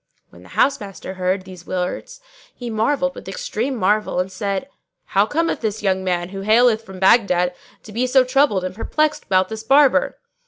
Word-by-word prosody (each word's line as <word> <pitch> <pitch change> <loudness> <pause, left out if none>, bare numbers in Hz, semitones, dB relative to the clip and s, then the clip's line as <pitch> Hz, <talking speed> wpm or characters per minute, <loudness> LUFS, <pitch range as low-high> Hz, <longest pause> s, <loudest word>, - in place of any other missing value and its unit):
When - - -16
the - - -16
housemaster 205 -9 -1
heard 185 +1 -1
these 180 -2 -12
words 185 - -4 0.3
he 240 -2 -6
marvelled 270 +5 0
with - - -11
extreme - - -3
marvel 210 -2 +1
and 185 +1 -2
said, 200 +4 -3 0.4
"How 200 +2 +2
cometh 330 +7 -1
this 220 -1 -3
young 190 -1 +1
man, 175 -1 -1
who 195 0 -6
haileth 220 +2 +4
from 190 -2 -11
Baghdad, 185 -3 +3 0.3
to 215 - -12
be 240 +4 0
so 260 +1 +5
troubled 255 -7 +2
and 185 0 -4
perplexed 305 +9 -1
about 185 -1 +2
this 220 0 -6
Barber?" 280 - +4
210 Hz, 180 wpm, -20 LUFS, 185-255 Hz, 0.4 s, so